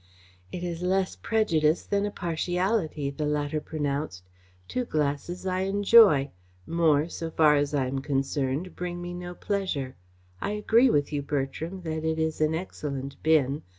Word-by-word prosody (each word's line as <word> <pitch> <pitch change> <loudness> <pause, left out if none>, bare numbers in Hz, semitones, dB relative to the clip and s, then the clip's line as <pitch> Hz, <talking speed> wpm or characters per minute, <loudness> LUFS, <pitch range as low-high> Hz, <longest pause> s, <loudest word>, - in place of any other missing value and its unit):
"It 180 - -5
is 170 -1 -4
less 185 +1 0
prejudice 165 -8 +1
than 200 0 0
a - - -2
partiality," 175 -3 -1
the 150 +2 -3
latter 150 +1 -1
pronounced. 145 - -3 0.4
"Two 250 - -1
glasses 155 0 -2
I 185 0 0
enjoy. 195 -6 +5 0.3
More, 160 +1 +2
so 165 -1 -5
far 155 -2 +4
as 145 0 0
I 135 -2 +1
am 135 +1 -2
concerned, 135 +3 -2
bring 175 0 -4
me 175 0 -6
no 175 0 -7
pleasure. 180 -12 -2 0.5
I 205 - -1
agree 225 +4 +4
with 145 -6 +1
you, 145 - 0
Bertram, 145 +6 -3
that 160 -2 -4
it 160 0 0
is 160 -1 -1
an 155 +1 +2
excellent 140 -6 -5
bin. 150 -3 +2
160 Hz, 155 wpm, -27 LUFS, 145-180 Hz, 0.5 s, enjoy